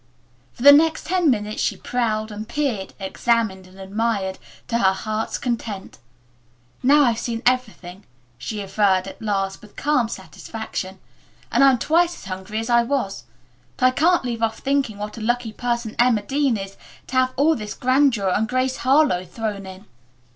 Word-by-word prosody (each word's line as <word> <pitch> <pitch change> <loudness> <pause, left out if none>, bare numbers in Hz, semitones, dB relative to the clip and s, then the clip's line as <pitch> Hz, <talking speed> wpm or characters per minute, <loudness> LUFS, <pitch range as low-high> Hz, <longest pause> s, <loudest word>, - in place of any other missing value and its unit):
For 240 - -9
the 285 - +11
next 315 +2 +4
ten 355 -2 +2
minutes 210 -4 -1
she - - 0
prowled 220 -3 -2
and 215 +2 -7
peered, 255 -10 -2
examined 195 -1 0
and 185 +1 -17
admired, 195 -1 -2 0.3
to 235 - +1
her 190 -3 +4
heart's 215 +2 -3
content. 225 - -4 0.8
"Now 290 +3 +5
I've 235 -4 +2
seen 230 0 -4
everything," 210 -7 -1 0.3
she 215 -2 -4
averred, 195 -1 +1
at - - -10
last, 195 -3 -2
with 210 -1 -16
calm 265 -6 +1
satisfaction, 220 -5 -6 0.5
"and - - +4
I'm 270 -2 +6
twice 340 +7 +2
as - - -13
hungry 190 +3 -6
as 225 +1 -2
I 235 0 +5
was. 235 - -2 0.5
But 255 - +2
I 255 - +6
can't 330 +3 +2
leave 235 -2 -3
off 225 -1 0
thinking 275 -6 -1
what 210 +2 -6
a - - -8
lucky 240 0 -1
person 235 -1 -2
Emma 240 -4 +3
Dean 275 0 +1
is 195 0 -7 0.3
to 260 - -3
have 255 0 +2
all 310 +4 +3
this 210 -5 -6
grandeur 255 -6 +2
and 215 +4 0
Grace 255 +1 0
Harlowe 265 -8 +3
thrown 200 +1 -5
in." 190 +2 -11
225 Hz, 170 wpm, -22 LUFS, 200-255 Hz, 0.8 s, the